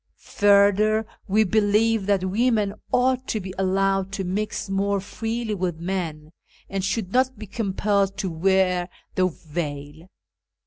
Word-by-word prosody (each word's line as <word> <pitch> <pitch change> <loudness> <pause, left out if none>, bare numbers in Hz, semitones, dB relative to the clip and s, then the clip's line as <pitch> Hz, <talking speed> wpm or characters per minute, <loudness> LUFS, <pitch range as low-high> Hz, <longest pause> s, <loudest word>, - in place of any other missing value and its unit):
Further, 205 +2 +3 0.2
we 215 +2 +4
believe 215 +1 +2
that 195 -2 +2
women 210 0 +1 0.2
ought 255 +1 +2
to 220 - -1
be 190 -1 -7
allowed 195 0 +1
to 195 -1 -2
mix 205 +4 -3
more 200 +1 0
freely 225 +3 -3
with 180 -4 -2
men, 165 -4 -4 0.4
and 195 -1 -3
should 195 -1 -2
not 260 0 +2
be 215 - -7
compelled 200 -1 0
to 190 -3 -2
wear 180 +1 +2 0.2
the 185 0 +2
veil. 150 -1 -6
195 Hz, 135 wpm, -24 LUFS, 185-215 Hz, 0.4 s, we